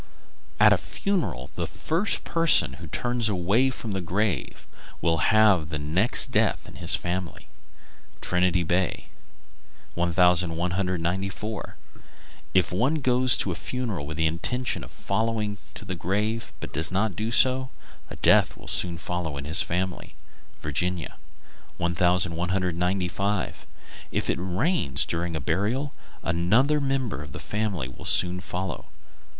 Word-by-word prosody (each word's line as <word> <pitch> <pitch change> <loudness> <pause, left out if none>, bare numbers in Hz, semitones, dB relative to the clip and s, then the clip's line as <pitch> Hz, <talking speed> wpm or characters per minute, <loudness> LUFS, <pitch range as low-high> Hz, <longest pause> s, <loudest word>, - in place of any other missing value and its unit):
At - - +7
a - - +2
funeral 195 -4 -3
the - - -3
first 175 +7 -1
person 165 - +5
who 85 - -7
turns 120 +6 0
away 100 +7 +2
from 120 -4 -6
the 95 -1 -2
grave 95 -2 -2 0.3
will 80 -1 +1
have 105 -8 +4
the 75 - -3
next 80 +10 +3
death - - +1
in - - -12
his - - +2
family. 90 0 -4 0.7
Trinity 90 0 +1
Bay, 90 +2 -1 0.9
N.F. 85 0 -1
1194. 90 +3 0 0.8
If 95 -1 +3
one 125 - +1
goes 130 -3 +3
to 95 - 0
a - - -1
funeral 110 - -4
with 75 0 -6
the 80 - +1
intention 115 +10 -1
of - - -10
following 105 0 -2 0.2
to - - -9
the 95 - -4
grave 105 +6 -2
but - - -8
does 80 +4 +1
not 100 0 0
do 110 +4 -2
so, 130 +2 +3 0.4
a - - -7
death - - +4
soon 85 -1 +4
follows 85 -4 -4
in 70 - -6
his 80 +3 +2
family. 90 +1 -3 0.5
Virginia. 85 +3 -3 0.6
1195. 90 +2 0 0.4
If - - 0
it - - -3
rains 95 - +1
during 85 0 -3
a - - -1
burial, 110 - -1 0.3
another 110 - +2
member 135 - -1
of 75 - -10
the - - -6
family 105 -10 -2
will 65 - -12
soon 90 0 +3
follow. 90 -1 -5
90 Hz, 135 wpm, -25 LUFS, 85-110 Hz, 0.9 s, At